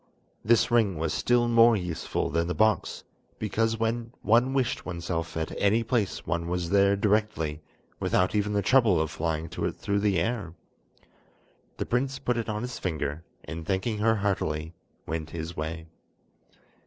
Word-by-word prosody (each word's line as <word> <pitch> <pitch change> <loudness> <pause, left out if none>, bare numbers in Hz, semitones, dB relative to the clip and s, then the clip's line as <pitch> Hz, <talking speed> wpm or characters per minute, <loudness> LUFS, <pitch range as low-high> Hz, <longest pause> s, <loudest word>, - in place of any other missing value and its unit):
This 115 +2 +3
ring 110 -7 +3
was 80 0 -1
still 120 -1 +2
more 115 -1 +6
useful 90 -4 -3
than 85 0 0
the 90 - -2
box, 110 +5 +1 0.3
because 110 +2 0
when 115 +1 -1
one 120 +4 +4
wished 135 -3 0
oneself 85 -2 -4
at 80 -1 -2
any 105 +3 +3
place 110 -3 -1
one 85 -1 -2
was 90 -1 -2
there 100 0 +4
directly, 100 -7 0 0.4
without 90 0 +1
even 105 0 0
the 100 -1 +1
trouble 115 -6 +4
of 80 -1 -1
flying 80 0 -2
to 75 - -3
it - - -1
through 100 0 -1
the 100 -2 +2
air. 100 -4 -2 1.2
The - - -2
prince 135 +2 0
put 130 -3 -1
it 115 -1 -3
on 105 +1 -2
his 125 0 -5
finger, 75 -3 -3 0.2
and 80 0 -6
thanking 100 +5 -1
her 110 +1 +3
heartily, 85 -6 -1 0.3
went 80 0 -4
his 80 0 -6
way. 80 +1 -4
100 Hz, 165 wpm, -27 LUFS, 85-115 Hz, 1.2 s, more